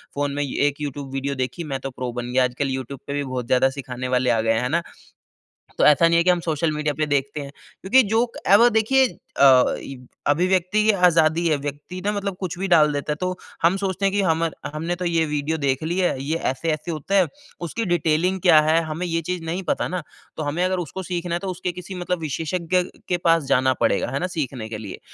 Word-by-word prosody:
Phone 145 0 -1
में 145 0 -1
एक 145 +2 -1
YouTube 140 -1 -5
video 140 +1 -2
देखी 130 +7 -3
मैं 135 - -2
तो 135 - -5
प्रो 125 -1 -5
बन 120 0 -5
गया। 130 0 +3
आजकल 125 +2 -1
यूट्यूब 130 0 -5
पे 140 - -3
भी 145 0 -1
बहुत 130 -2 -4
ज़्यादा 130 +1 +3
सिखाने 130 -2 -6
वाले 125 0 +1
आ 115 -2 +3
गए 115 0 +2
हैं। 115 - 0
है 125 - -1
ना? 170 +3 +1 1.0
तो - - +4
ऐसा 150 +3 +6
नहीं 170 0 +3
है 170 - +4
कि 180 - +2
हम 180 -1 +4
सोशल 155 +1 0
मीडिया 150 -1 -1
पे 155 - +1
देखते 145 0 -1
हैं, 140 0 -8 0.3
क्योंकि 255 +7 +5
जो 225 +3 +2
क - - -7
ए, 200 - +8
व 240 +2 +6
देखिए 250 +4 +3 0.3
अ, 130 -2 +6
ये 135 - -8 0.3
अभिव्यक्ति 185 +6 +2
की 220 - +5
आज़ादी 170 -3 +3
है, 155 - +3
व्यक्ति 145 +6 -6
ना 205 - +2
मतलब 200 -2 -3
कुछ 180 -3 -4
भी 195 - -1
डाल 155 -4 +5
देता 145 +1 -2
है - - 0
तो 185 0 -2 0.3
हम 175 +3 +4
सोचते 195 0 -2
हैं 195 - +3
कि 205 - +2
हमर 165 -3 0 0.2
हमने 165 +3 -2
तो 180 0 -5
ये 165 -1 +2
वीडियो 150 +1 -2
देख 140 0 -1
ली 170 +3 -2
है, 175 -7 0
ये 155 +3 -1
ऐसे-ऐसे 155 +5 -2
होता 160 +6 -3
है। 185 -3 +5 0.3
उसकी 205 +7 -3
डिटेलिंग 175 +2 +1
क्या 165 -4 +7
है? 160 +2 +3
हमें 160 +3 -4
ये 165 0 -1
चीज़ 180 +1 -4
नहीं 175 +4 -3
पता - - -1
ना, 180 -1 -3 0.4
तो 155 - -2
हमें 155 +5 -1
अगर 185 0 0
उसको 175 +3 -5
सीखना 175 -1 -3
है, - - -1
तो 195 - -6
उसके 180 0 -3
किसी 180 +2 -8
मतलब 180 0 -2
विशेषज्ञ 165 +4 -1 0.3
के 180 - +2
पास 165 -2 +2
जाना 130 -1 +2
पड़ेगा। - - +2
है - - -1
ना? 180 - -1
सीखने 135 -9 -4
के 110 - -5
लिए। 105 -3 -8
160 Hz, 245 wpm, -23 LUFS, 140-180 Hz, 1.0 s, ए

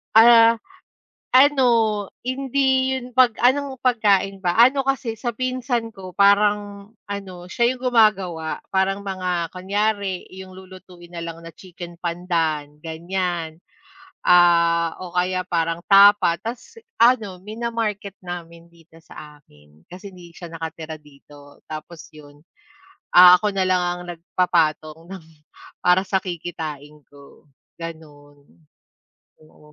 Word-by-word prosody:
Ah, 230 0 +7 0.8
ano, 275 0 +5 0.6
hindi 265 0 0
yun 250 -1 -7
'pag 245 -2 +3
anong 265 0 +1
pagkain 200 -5 +1
ba? 175 -2 -1
Ano 255 +4 +5
kasi 240 -4 -2
sa 240 -3 -4
pinsan 250 -2 -2
ko 185 -3 -12
parang 205 0 +2
ano, 200 -2 -7 0.2
siya 240 +2 +1
yung 250 0 -3
gumagawa 190 -8 +1
parang 195 +1 0
mga 180 -3 -3
kunyari 200 0 -2
'yong 185 0 -11
lulutuin 185 -2 -14
na 170 - -7
lang 165 0 -8
na 165 - -10
chicken 175 -1 -12
pandan, 165 -4 -3
ganyan, 170 0 -4 0.7
ah, 170 -1 +4
o 180 -2 -9
kaya 185 0 -1
parang 165 -2 -1
tapa 200 -3 +5
ta's 245 - -8 0.2
ano, 225 -6 +2
mina-market 215 -1 -5
namin 170 -1 -8
dito 170 -1 -22
sa 150 -2 -13
amin 75 - -25
kasi 190 +3 -11
hindi 175 -2 -15
siya 175 -1 -10
nakatira 160 -1 -7
dito. 145 -1 -18
Tapos 155 +2 -9
yun, 145 -1 -17 0.7
ah, 180 0 +9
ako 210 +1 -2
na 190 -1 0
lang 180 -1 +2
ang 175 0 -3
nagpapatong 165 -2 -1
ng 185 -2 -11 0.6
para 180 +1 +4
sa 190 0 -2
kikitain 160 -5 -6 0.2
ko, 140 -1 -18 0.3
gano'n. 150 -3 -11 1.0
Oo. 150 -1 -21
185 Hz, 125 wpm, -21 LUFS, 165-210 Hz, 1.0 s, ah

